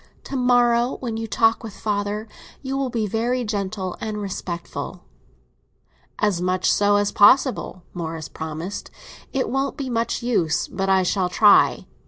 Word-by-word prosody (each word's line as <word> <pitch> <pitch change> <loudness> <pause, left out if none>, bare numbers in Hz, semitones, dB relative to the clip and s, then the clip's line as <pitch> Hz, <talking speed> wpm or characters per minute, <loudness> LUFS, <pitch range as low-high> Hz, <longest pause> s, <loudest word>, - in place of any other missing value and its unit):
To - - -6
morrow, 245 -1 +3
when 235 -4 -4
you 225 0 -4
talk 225 +2 +2
with 220 -3 -8
father, 210 +1 -2 0.4
you 270 0 -3
will 270 -1 -1
be 230 -3 -1
very 235 +4 -1
gentle 200 -3 -3
and 215 -1 -3
respectful." 180 -4 -5 1.1
"As 205 -5 +1
much 185 +1 +2
so 205 0 +3
as 205 0 +2
possible," 230 -4 +3
Morris 160 -3 -5
promised. 160 +5 -6 0.4
"It 270 -2 -1
won't 270 +3 -1
be 270 -3 -4
much 230 +1 -1
use, 175 -10 +1
but 195 +1 -3
I 190 -1 +4
shall 180 0 0
try. 205 +2 +5
210 Hz, 150 wpm, -22 LUFS, 185-240 Hz, 1.1 s, try